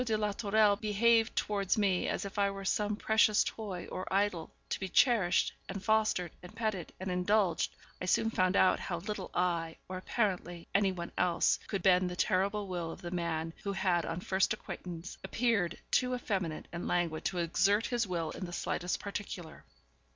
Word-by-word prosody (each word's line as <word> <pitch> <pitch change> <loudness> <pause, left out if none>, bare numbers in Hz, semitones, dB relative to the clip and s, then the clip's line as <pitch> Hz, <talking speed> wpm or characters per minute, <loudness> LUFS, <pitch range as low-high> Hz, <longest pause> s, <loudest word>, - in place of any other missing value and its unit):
de 225 -3 0
la 210 -1 0
Tourelle 210 0 +3
behaved 225 +2 +3
towards 200 -2 0
me 195 -4 +2
as - - -2
if 200 +1 -5
I 200 0 +3
were 195 0 -6
some 210 +2 +1
precious 220 0 +4
toy 195 -5 -5
or 185 - -5
idol, 195 -4 +1 0.2
to - - -2
be 190 - -4
cherished, 230 -6 +3 0.2
and 195 0 -5
fostered, 215 -6 +2
and 180 +5 -12
petted, 215 -7 -2
and 185 0 -3
indulged, 180 -1 +1 0.3
I - - -2
soon 225 +4 +2
found 185 -2 +2
out 185 - +4
how 175 - -3
little 200 +2 -5
I, 170 -2 0
or, 185 - -5
apparently, 180 -5 -2
any 195 0 +3
one 170 -2 -6
else, 175 -2 +3
could 195 -4 -3
bend 185 -1 +4
the 180 - -5
terrible 200 +3 +1
will 175 -3 -3
of 165 - -9
the 175 - -5
man 165 -2 -2
who 200 -1 -2
had 185 -3 +1
on 165 +2 -4
first 190 0 +1
acquaintance 175 0 -7
appeared 225 -8 +1
to - - -14
me - - -23
too 250 0 +2
effeminate 190 -10 -3
and 170 +1 -4
languid 170 -3 0
to 185 - -1
exert 195 +5 +2
his 240 -3 0
will 170 -3 -2
in 185 - -5
the 175 - -8
slightest 180 0 -2
particular. 195 -5 -6
190 Hz, 190 wpm, -32 LUFS, 175-210 Hz, 0.3 s, precious